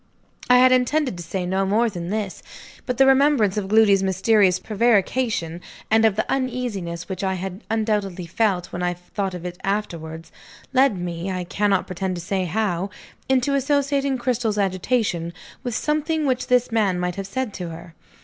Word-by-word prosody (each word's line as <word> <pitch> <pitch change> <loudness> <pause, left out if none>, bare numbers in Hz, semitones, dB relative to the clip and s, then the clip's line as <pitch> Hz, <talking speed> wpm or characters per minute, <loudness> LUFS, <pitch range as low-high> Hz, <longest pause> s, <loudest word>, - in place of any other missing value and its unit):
I 250 - +7
had 255 +1 +6
intended 255 0 +2
to 175 - -6
say 180 +2 -3
no 190 +2 0
more 215 +5 +2
than 175 -5 -5
this. 205 -2 -3 0.5
But 250 -2 -1
the 270 - +6
remembrance 270 -7 +4
of 205 -2 -2
Gloody's 205 -2 +5
mysterious 190 0 +3
prevarication, 215 -5 0 0.3
and 220 0 +5
of 215 -3 +3
the 220 - 0
uneasiness 240 -11 -3
which 190 0 -5
I 190 -1 0
had 190 +3 -6
undoubtedly 210 -5 -1
felt 185 0 0
when 175 - -4
I 175 0 0
thought 185 +2 -4
of 180 0 -8
it 180 0 -6
afterwards, 165 -5 -3 0.4
led 265 -5 +4
me 175 +1 -4
(I 185 -1 -2
cannot 200 +1 +1
pretend 185 +1 -3
to 175 - -5
say 190 +1 -1
how) 190 0 -1 0.4
into 265 +1 +2
associating 280 0 +1
Cristel's 240 -3 -1
agitation 185 -3 0 0.3
with 245 -3 -3
something 305 +2 0
which 255 -2 0
this 250 -1 +2
man 205 -5 +1
might 180 0 -1
have 195 -1 -4
said 260 -3 -3
to 180 -3 -5
her. 165 +1 -10
205 Hz, 175 wpm, -23 LUFS, 180-245 Hz, 0.5 s, I